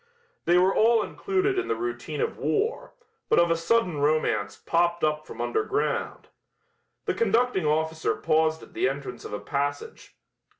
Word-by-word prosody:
They 175 - +4
were 185 +2 +4
all 225 0 +4
included 385 - 0
in 370 - -3
the - - 0
routine 360 +4 -4
of 460 - -1
war, 440 +4 -1 0.3
but - - +4
of 170 0 +4
a - - +4
sudden 175 -1 +1
romance 145 -9 +1
popped 170 0 +1
up 155 0 0
from 115 - -10
underground. 120 - -1 0.8
The - - 0
conducting 245 - +1
officer 160 +1 0
paused 160 0 +1
at - - -15
the - - +1
entrance 135 -3 -6
of - - -7
a 105 - -3
passage. 145 0 -4
165 Hz, 160 wpm, -26 LUFS, 150-235 Hz, 0.8 s, They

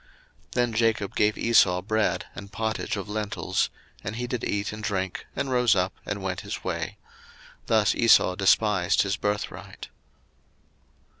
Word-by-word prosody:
01:025:034 - - -39
Then 120 -2 +1
Jacob 110 -3 +1
gave 105 0 +2
Esau 90 -6 +4
bread 110 +1 0
and 100 0 -9
pottage 110 +2 -2
of 100 - -5
lentiles; 105 0 -1 0.3
and 110 - -4
he 120 +1 -3
did 125 -1 -4
eat 100 +1 -1
and 110 - -7
drink, 95 -3 -2
and 135 - -2
rose 125 -3 +4
up, 95 +1 0
and 100 -2 -3
went 95 -2 -2
his - - -6
way: - - -3 0.7
thus 110 -3 +3
Esau 115 -5 +5
despised 95 -1 +3
his 100 -1 -1
birthright. 105 +1 -4
105 Hz, 150 wpm, -26 LUFS, 100-110 Hz, 0.7 s, Esau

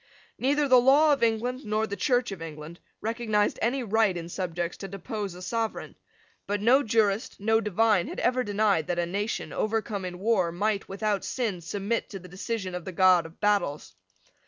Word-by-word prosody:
Neither 285 +3 +2
the 255 -2 +6
law 290 +4 +5
of 280 - -2
England 235 +4 0
nor 215 -1 0
the 200 - -5
Church 245 +3 +1
of 190 -4 -7
England 160 +1 -8 0.2
recognised 220 -2 0
any 250 +3 0
right 220 -4 +2
in 170 0 -6
subjects 175 -1 -3
to 195 - -7
depose 200 0 -5
a 180 - -10
sovereign. 225 +3 -3 0.5
But 205 0 -1
no 245 +7 +5
jurist, 220 0 0
no 220 +2 +2
divine, 210 -2 +2
had - - -6
ever 255 0 +1
denied 205 -6 +1
that 175 - -1
a 175 - +1
nation, 200 +5 -3
overcome 215 -2 -2
in 180 -1 -5
war, 190 -3 +1
might, 200 +3 -1
without 200 +1 -1
sin, 220 -9 -2
submit 200 +7 -2
to 200 - -6
the 180 -1 -12
decision 195 +1 -4
of 180 -1 -5
the 185 - -6
God 180 -2 +4
of 165 - -19
battles. 185 - 0
205 Hz, 185 wpm, -27 LUFS, 180-230 Hz, 0.5 s, the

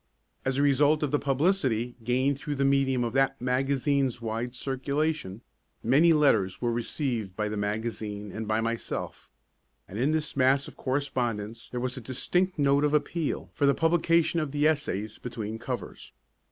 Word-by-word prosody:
As 130 0 0
a 140 - +3
result 145 +2 +3
of 145 - 0
the 145 - +2
publicity 135 - +1
gained 130 +4 +1
through 145 +1 -3
the 140 0 +1
medium 135 -2 +2
of 120 -1 -2
that 135 0 +2
magazine's 135 +1 +1
wide 115 +2 -3
circulation, 140 -4 -2 0.4
many 145 +8 +5
letters 115 - +3
were 120 -1 0
received 120 - -2
by 105 +1 -1
the 105 - -3
magazine 105 -1 -3
and 110 +2 -5
by 110 +1 +1
myself; 115 0 -4 0.6
and 100 - -7
in 135 +5 +2
this 155 -2 -1
mass 135 +1 +3
of - - -11
correspondence 120 -5 -2
there 125 - -4
was 125 +1 -2
a - - -5
distinct 180 +10 0
note 140 0 +3
of 150 0 +3
appeal 155 +1 -1
for 140 - +2
the 140 - +4
publication 165 0 +2
of 155 -3 -2
the 145 +1 +3
essays 110 -9 -1
between 115 -3 -5
covers. - - -6
130 Hz, 165 wpm, -28 LUFS, 115-145 Hz, 0.6 s, many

